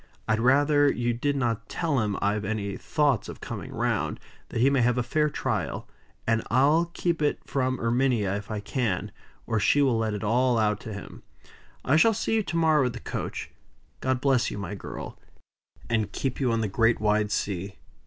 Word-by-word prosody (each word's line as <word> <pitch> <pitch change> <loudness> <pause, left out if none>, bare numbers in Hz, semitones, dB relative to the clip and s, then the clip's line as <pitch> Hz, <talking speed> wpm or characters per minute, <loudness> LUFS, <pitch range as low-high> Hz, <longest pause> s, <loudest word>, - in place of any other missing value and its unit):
I'd 110 0 +2
rather 145 +4 +4
you 120 0 -1
did 140 +5 -1
not 115 -4 -1
tell 160 -6 0
him 105 -3 -1
I've 105 +1 +1
any 100 -1 -2
thoughts 145 -3 0
of - - -8
coming - - -6
round, - - -1 0.3
that - - -3
he 125 - +5
may 135 -2 +3
have 120 +1 +2
a 125 - +1
fair 150 +5 +1
trial; - - -3 0.4
and 115 0 +2
I'll 145 +9 +4
keep 170 -3 0
it 150 - +1
from 130 -1 0
Erminia 115 -4 +1
if 100 0 -6
I 105 -2 -3
can, 105 -3 -2 0.3
or 115 -2 0
she 125 +8 +3
will 125 -5 +2
let 110 -2 -1
it 105 - -5
all 120 +3 +2
out 105 -1 +1
to 110 - -7
him. 100 - -9 0.6
I 140 +5 +4
shall 225 +6 +5
see 225 - -1
you 225 - +3
to 170 -4 -3
morrow 155 -5 +4
at 125 - -4
the 120 - -7
coach. - - -5 0.5
God 130 -1 0
bless 135 -3 +2
you, - - -6
my 100 -2 -5
girl, 100 - -7 0.7
and 110 -3 0
keep 130 +4 -3
you 130 -4 +1
on 115 0 +1
the 110 - 0
great 115 +4 +2
wide 105 0 +1
sea." 95 0 -2
120 Hz, 200 wpm, -26 LUFS, 105-140 Hz, 0.7 s, he